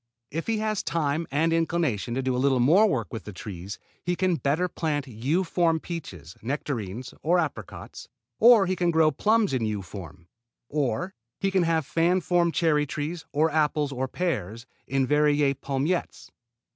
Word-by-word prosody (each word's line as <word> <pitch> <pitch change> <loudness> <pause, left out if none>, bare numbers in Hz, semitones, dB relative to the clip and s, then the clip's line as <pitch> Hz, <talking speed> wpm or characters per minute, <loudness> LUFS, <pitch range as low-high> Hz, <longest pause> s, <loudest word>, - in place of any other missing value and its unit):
If 165 +3 -4
he 225 -1 +1
has 215 -1 -1
time 160 0 -1
and 160 +4 +1
inclination 160 -9 0
to 135 - -1
do 130 -1 0
a 125 - 0
little 135 -2 +3
more 170 - +5
work 115 - -2
with 110 -6 -6
the 105 - -7
trees 95 0 -7 0.3
he 175 0 0
can 185 0 +1
better 150 +7 +1
plant 150 -4 -2
U 135 - -1
form 165 -2 +1
peaches, 95 - -8
nectarines 120 -3 -4
or 175 +4 +3
apricots, 145 - -5 0.3
or 230 -4 +7
he 185 +1 0
can 175 -1 +1
grow 160 -2 +4
plums 215 +4 +2
in 125 -3 0
U 105 -2 -3
form, 85 -3 -10 0.4
or 150 - -1 0.3
he 195 0 0
can 190 -1 +3
have 165 -3 +1
fan 170 +5 +2
form 175 -1 +2
cherry 150 -3 +2
trees, 150 +4 -4
or 155 +3 +2
apples 150 -2 +1
or 130 0 -2
pears 120 - -3 0.2
in 135 0 +1
Verrier 150 0 +3
palmettes. 140 +5 -2
150 Hz, 170 wpm, -26 LUFS, 130-170 Hz, 0.4 s, or